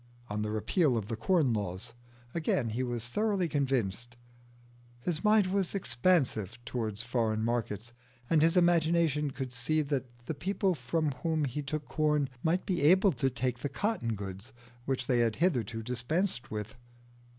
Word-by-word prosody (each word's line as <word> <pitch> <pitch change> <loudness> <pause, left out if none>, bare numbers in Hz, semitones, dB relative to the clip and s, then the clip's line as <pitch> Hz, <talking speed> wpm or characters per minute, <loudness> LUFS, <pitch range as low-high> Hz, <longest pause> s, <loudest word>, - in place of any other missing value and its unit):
On 105 0 -1
the 105 - -1
Repeal 125 - +2
of 105 -2 -4
the 115 - -1
Corn 145 - +2
Laws, 105 +2 -4 0.4
again, 145 -7 0
he 115 +4 -2
was 120 -2 -2
thoroughly 200 - +1
convinced. 120 -5 -1 0.8
His 160 - -2
mind 210 -1 +5
was 195 -1 0
expansive 125 - +1
towards 110 -2 -3
foreign 115 -3 0
markets, 115 -1 -2 0.3
and 160 +1 +3
his 165 +3 +4
imagination 165 -4 +3
could 130 -2 -5
see 155 +6 +1
that 130 -4 -4
the 160 - -2
people 190 +5 0
from 160 -2 -1
whom 160 -2 +1
we 140 +1 -2
took 145 0 -4
corn 150 -1 +1
might 170 +3 +1
be 180 -5 0
able 185 +6 +6
to 135 -5 0
take 125 0 -2
the 145 - -3
cotton 195 - -1
goods 100 +4 -7 0.3
which 130 -1 -1
they 125 -1 +2
had 115 -2 +2
hitherto 115 - 0
dispensed 125 - -1
with. 105 -1 -5
130 Hz, 160 wpm, -31 LUFS, 115-165 Hz, 0.8 s, able